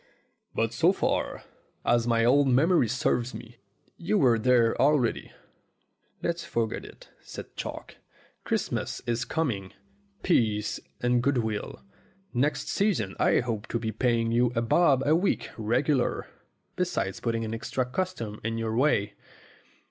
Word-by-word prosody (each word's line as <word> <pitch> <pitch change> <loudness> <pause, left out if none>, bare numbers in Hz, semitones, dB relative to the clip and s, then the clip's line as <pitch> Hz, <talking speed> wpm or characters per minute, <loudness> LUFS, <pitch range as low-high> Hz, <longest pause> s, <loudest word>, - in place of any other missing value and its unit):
"But 115 0 0
so 160 +10 +4
far - - -1 0.4
as 120 -1 +2
my 115 -1 +3
old 140 +3 +4
memory 140 +2 +4
serves 120 +1 0
me, 120 0 -10 0.4
you 175 +5 0
were 120 - +4
there 120 -1 +3
already." 140 -4 +2 0.9
"Let's 170 0 -1
forget 115 -2 -2
it," - - -14
said - - -10
Chalk. - - -7 0.5
"Christmas - - -2
is 115 0 -1
com 160 +2 0
ing. 95 -3 -7 0.5
Peace 110 - +1 0.2
and 120 0 +2
good 140 +1 +1
will. 110 -3 -3 0.5
Next 140 +3 0
season 175 - 0
I - - +3
hope 115 -3 -4
to - - -1
be 115 -1 -3
paying 115 0 +1
you 120 +1 +3
a 115 - +2
bob 135 +1 +3
a 150 +2 +4
week 185 +4 0
regular, 125 +5 0 0.5
besides 95 0 -1
putting 115 -1 -1
extra 125 +3 -2
custom 125 - -4
in 115 +1 -2
your 110 -1 -2
way." 115 -6 +2
120 Hz, 140 wpm, -27 LUFS, 115-140 Hz, 0.9 s, so